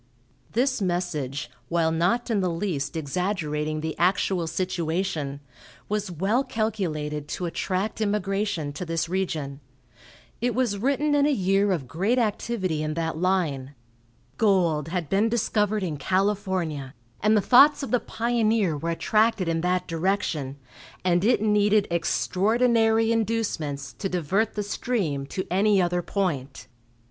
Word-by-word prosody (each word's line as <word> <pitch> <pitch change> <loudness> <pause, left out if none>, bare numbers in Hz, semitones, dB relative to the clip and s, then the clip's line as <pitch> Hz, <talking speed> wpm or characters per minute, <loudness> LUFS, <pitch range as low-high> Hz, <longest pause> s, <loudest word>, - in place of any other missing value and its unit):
This 255 0 +1
message, 155 -8 -2 0.2
while 165 -1 +2
not 185 +10 +1
in 215 - +2
the 185 - +1
least 165 -5 -2
exaggerating 155 -1 -2
the 160 0 -3
actual 180 -1 +2
situation, 165 -4 -2 0.5
was 210 -1 -1
well 195 - +1
calculated 155 - -2
to 175 +4 -4
attract 190 +5 -2
immigration 200 -6 -1
to 155 - -5
this 165 -1 -1
region. 160 -7 -2 0.8
It 245 0 0
was 240 -6 0
written 280 +5 +1
in 290 0 +4
a - - +3
year 195 -3 +2
of 155 -9 -2
great 195 - 0
activity 205 -7 -1
in 155 0 -2
that 165 -1 -2
line. 155 -7 0 0.6
Gold 175 -8 +2
had 170 -2 -2
been 200 +8 +2
discovered 215 -2 +1
in 160 -5 -2
California, 185 -6 -1 0.3
and 215 +1 +4
the - - +5
thoughts 275 +8 +6
of 275 - -4
the 250 - +3
pioneer 225 -7 +1
were 165 +3 -3
attracted 215 +3 +2
in 165 -1 0
that 180 +1 0
direction, 165 -5 -1 0.5
and 175 0 +3
it 225 -1 +3
needed 210 -1 +3
extraordinary 225 +6 +2
inducements 200 -11 -1
to 195 - -2
divert 185 +5 0
the 210 - -1
stream 190 - -2
to 185 +5 -4
any 200 +2 +3
other 175 -1 +1
point. 140 - -2
185 Hz, 135 wpm, -25 LUFS, 160-215 Hz, 0.8 s, thoughts